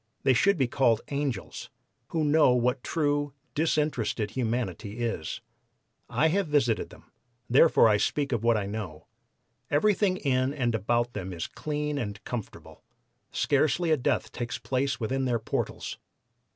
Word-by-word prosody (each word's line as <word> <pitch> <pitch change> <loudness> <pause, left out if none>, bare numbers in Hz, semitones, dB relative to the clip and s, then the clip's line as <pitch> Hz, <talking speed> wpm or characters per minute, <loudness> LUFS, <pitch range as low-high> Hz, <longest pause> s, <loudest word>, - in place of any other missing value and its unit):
They 130 - +5
should 200 - +3
be 130 -4 +2
called 120 -3 +2
'angels,' 140 -7 -3 0.4
who 160 -2 -1
know 150 -3 +5
what 125 +1 +1
true, 145 -3 0 0.2
disinterested 150 -9 0
humanity 115 -4 -3
is. 115 -10 -3 0.7
I 160 - +2
have 195 +2 +1
visited 140 -7 +1
them, - - -17 0.4
therefore 130 0 +6
I 105 -1 +4
speak 140 +6 0
of 115 -3 -1
what 115 -1 +4
I 100 - -2
know. 100 -7 -6 0.6
Everything 190 +4 +2
in 130 -3 0
and 120 -5 0
about 120 +3 0
them 95 -2 -5
is 85 -2 -4
clean 150 -1 -3
and 105 -4 -4
comfortable; 120 -4 -7 0.5
scarcely 155 +4 +1
a - - +6
death 130 +1 0
takes 120 0 -4
place 135 +1 -1
within 130 +3 -1
their 120 -2 +1
portals. - - -4
130 Hz, 145 wpm, -28 LUFS, 115-150 Hz, 0.7 s, therefore